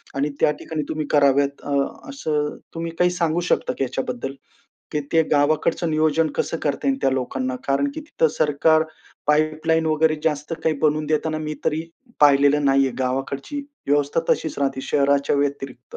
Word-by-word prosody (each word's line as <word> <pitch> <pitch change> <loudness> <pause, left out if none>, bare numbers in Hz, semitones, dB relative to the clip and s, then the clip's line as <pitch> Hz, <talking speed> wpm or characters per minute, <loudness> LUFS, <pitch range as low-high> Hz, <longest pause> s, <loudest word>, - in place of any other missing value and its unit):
आणि 140 +2 0
त्या - - +4
ठिकाणी 160 -1 -4
तुम्ही 155 -1 -2
कराव्यात 140 -1 +3
अ, - - -7 0.4
असं 150 - -2 0.2
तुम्ही 165 0 -3
काही 180 - +4
सांगू 170 -2 0
शकता - - +1
की - - 0
याच्याबद्दल? 130 0 -3 0.6
की 150 - 0
ते 165 -1 +5
गावाकडचं 155 +3 +2
नियोजन 155 +1 +2
कसं - - -1
करता 145 - -1
येईल 270 0 +1
त्या - - +3
लोकांना? 130 0 -2
कारण 140 - +1
की 315 - -5
तिथं 295 - +1
सरकार 155 +1 +3 0.4
पाईपलाईन 155 +2 +2
वगैरे 155 0 +2
जास्त 150 0 -1
काही 160 -2 +2
बनवून 155 0 +2
देताना 155 +1 0
मी 155 0 -4
तरी 155 +1 0 0.4
पाहिलेलं 145 0 +5
नाहीये. 135 0 +3
गावाकडची 135 - -2 0.3
व्यवस्था 145 +2 +2
तशीच 160 - -3
राहते 135 -1 0
शहराच्या 140 0 +2
व्यतिरिक्त. 140 -3 -3
150 Hz, 160 wpm, -22 LUFS, 140-160 Hz, 0.6 s, ते